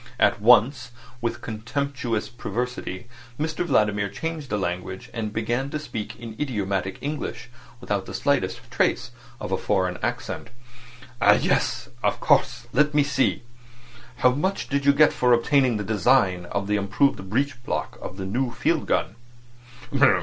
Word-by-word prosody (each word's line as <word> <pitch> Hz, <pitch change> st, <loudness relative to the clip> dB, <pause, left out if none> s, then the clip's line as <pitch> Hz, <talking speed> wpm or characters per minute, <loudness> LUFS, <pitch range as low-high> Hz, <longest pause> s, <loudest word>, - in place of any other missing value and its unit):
At -, -, +3 dB
once, 125 Hz, +4 st, +5 dB, 0.3 s
with 115 Hz, 0 st, -2 dB
contemptuous 120 Hz, 0 st, -2 dB
perversity, 120 Hz, -3 st, -4 dB, 0.3 s
Mr 160 Hz, +2 st, -1 dB
Vladimir 105 Hz, -, +2 dB
changed 155 Hz, +6 st, -5 dB
the 105 Hz, -, 0 dB
language, 90 Hz, 0 st, -4 dB
and 110 Hz, -2 st, -3 dB
began 120 Hz, +5 st, -1 dB
to 155 Hz, -, -2 dB
speak 115 Hz, -9 st, -6 dB
idiomatic 105 Hz, -6 st, -3 dB
English 140 Hz, -5 st, -4 dB, 0.3 s
without 100 Hz, -5 st, -2 dB
the 95 Hz, -, -6 dB
slightest 130 Hz, -10 st, 0 dB
trace -, -, +1 dB, 0.3 s
of -, -, -5 dB
a -, -, +2 dB
foreign 95 Hz, -3 st, 0 dB
accent. -, -, -3 dB, 0.7 s
"Ah! -, -, +7 dB
Yes. -, -, +1 dB
Of -, -, +1 dB
course. -, -, +2 dB
Let's 150 Hz, +3 st, +3 dB
see. 135 Hz, -3 st, +1 dB, 0.7 s
How 125 Hz, +1 st, +4 dB
much 185 Hz, +9 st, -1 dB
did 140 Hz, 0 st, 0 dB
you -, -, +9 dB
get 150 Hz, +1 st, +5 dB
for 125 Hz, -1 st, +3 dB
obtaining 125 Hz, 0 st, +3 dB
the 105 Hz, -, -3 dB
design 105 Hz, -4 st, +2 dB
of 100 Hz, +2 st, -2 dB
the 105 Hz, +1 st, +1 dB
improved 100 Hz, 0 st, +1 dB
breech 130 Hz, +2 st, -1 dB
block -, -, -3 dB
of 95 Hz, -, -7 dB
their 95 Hz, -, -4 dB
new 120 Hz, +6 st, -1 dB
field 115 Hz, -, 0 dB
gun?" 105 Hz, -, 0 dB
120 Hz, 145 wpm, -24 LUFS, 100-140 Hz, 0.7 s, you